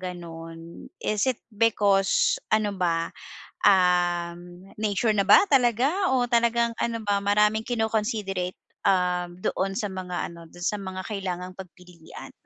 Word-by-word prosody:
gano'n? 165 -2 -9
Is 215 +4 0
it 255 - -1
because 215 - +2
ano 215 -1 +2
ba, 170 -2 -1 0.5
um, 175 -1 +1
nature 215 +1 +1
na 200 - +2
ba 200 - +7
talaga 270 - +2
o 250 -2 +2
talagang 235 -1 +2
ano 230 -1 -1
ba 200 -1 +1
maraming 210 +2 +2
kino-considerate, 215 -5 -2 0.3
um, 180 -2 +1
doon 195 +1 -1
sa 210 -4 -2
mga 180 -1 -4
ano 170 0 -12
do'n 175 - -14
sa 210 - 0
mga 190 -1 -6
kailangang 185 -3 -5
pagpilian? 180 -3 -12
195 Hz, 130 wpm, -25 LUFS, 180-220 Hz, 0.5 s, ba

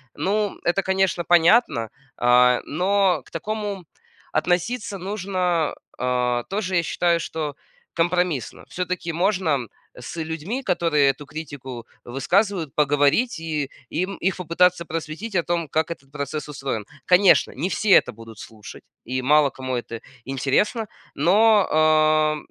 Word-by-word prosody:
Ну, 205 +6 -1
это, 175 +3 +2
конечно, 190 -2 +1
понятно, 170 - +3 0.3
а, 125 0 +4
но 190 +3 +1
к - - -20
такому 210 -3 -4 0.5
относиться 195 +6 -1
нужно, 185 -4 -1 0.2
а, 125 -1 0
тоже, 195 -2 -2
я 170 - +2
считаю, 170 +1 +1
что 155 -3 -4 0.4
компромиссно. 175 -4 0
Всё-таки 180 -2 -4
можно 170 - 0 0.3
с 125 +7 -8
людьми, 160 - -4
которые 165 - +2
эту 140 +2 -12
критику 140 -5 -8 0.2
высказывают, 175 - 0
поговорить 145 - +2
и 155 -4 -3 0.2
им 185 +4 -3
их 190 - +2
попытаться 180 +1 +2
просветить 165 +7 -5
о 170 - +2
том, 170 -1 -1
как 160 +2 0
этот 135 -5 -9
процесс 150 +1 -5
устроен. 135 -7 -4 0.2
Конечно, 180 -5 +5
не 155 +8 -2
все 215 - -2
это - - +6
будут 115 -1 -13
слушать, 110 -2 -11 0.2
и 130 +2 -2
мало 145 +2 +4
кому 130 -1 -5
это 115 -1 -6 0.3
интересно, 140 - 0 0.3
но, 205 +6 +4
а, 155 0 +3
165 Hz, 130 wpm, -23 LUFS, 140-185 Hz, 0.5 s, это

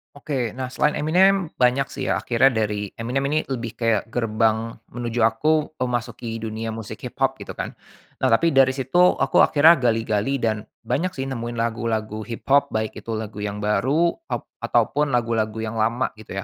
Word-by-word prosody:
Oke, 135 -5 -3
nah, 130 +2 -5
selain 150 +3 +1
Eminem 185 +4 +3
banyak 125 +2 +2
sih 135 - -6
ya, - - +1
akhirnya 130 +3 +3
dari 105 -3 -2
Eminem 125 +4 -1
ini 155 - +2
lebih 120 -3 -5
kayak 115 -1 0
gerbang 115 -1 0 0.2
menuju 120 -1 -2
aku 150 +8 +2
memasuki 120 -2 -3
dunia 110 0 -4
musik 110 -1 -6
hiphop - - -1
gitu - - -8
kan. - - -4 0.5
Nah, - - +2
tapi 165 +9 +3
dari 135 -2 +4
situ 160 +8 +3
aku 135 - +2
akhirnya 155 +1 +6
gali-gali 115 +3 0
dan 110 -4 -1 0.2
banyak 185 +4 -1
sih 135 - -3
nemuin 120 -1 -4
lagu-lagu 110 -2 -2
hiphop, 140 +4 +2
baik 110 0 0
itu 115 - -5
lagu 110 -1 -6
yang 105 0 -4
baru, 140 +11 +2 0.2
ap - - -3 0.2
ataupun 145 -3 +1
lagu-lagu 110 -2 0
yang 110 0 -4
lama 115 +4 +1
gitu 95 -3 -6
115 Hz, 170 wpm, -23 LUFS, 110-135 Hz, 0.5 s, akhirnya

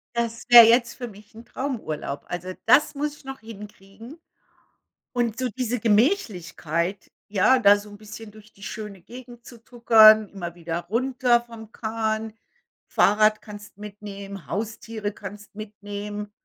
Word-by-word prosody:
Das 230 -1 -2
wär 240 -1 +11
jetzt 235 +1 +3
für 245 - -6
mich 205 -1 -16
'n 230 +1 -12
Traumurlaub. 220 - -5
Also, 180 +1 -5
das 290 +6 +4
muss 295 +1 -3
ich - - -21
noch 270 0 -7
hinkriegen. 210 - -12 0.9
Und 240 -2 -1
so 255 -1 -1
diese 245 0 -3
Gemächlichkeit, 200 - 0 0.2
ja, 215 +6 +3
da 205 -3 +6
so 205 +1 -11
'n 205 - -12
bisschen 215 +1 -11
durch 215 0 -17
die 200 - -16
schöne 210 -3 -7
Gegend 240 +3 -13
zu 240 - -12
tuckern, 220 -3 +6
immer 175 -4 -7
wieder 170 -1 -4
runter 245 +1 +1
vom 230 -2 -13
Kahn. 220 -1 -3 0.6
Fahrrad 215 +1 +3
kannst 205 -1 -12
mitnehmen, 200 -2 -9
Haustiere 215 0 -4
kannst 205 +1 -11
mitnehmen. 205 0 -7
215 Hz, 140 wpm, -24 LUFS, 205-235 Hz, 0.9 s, wär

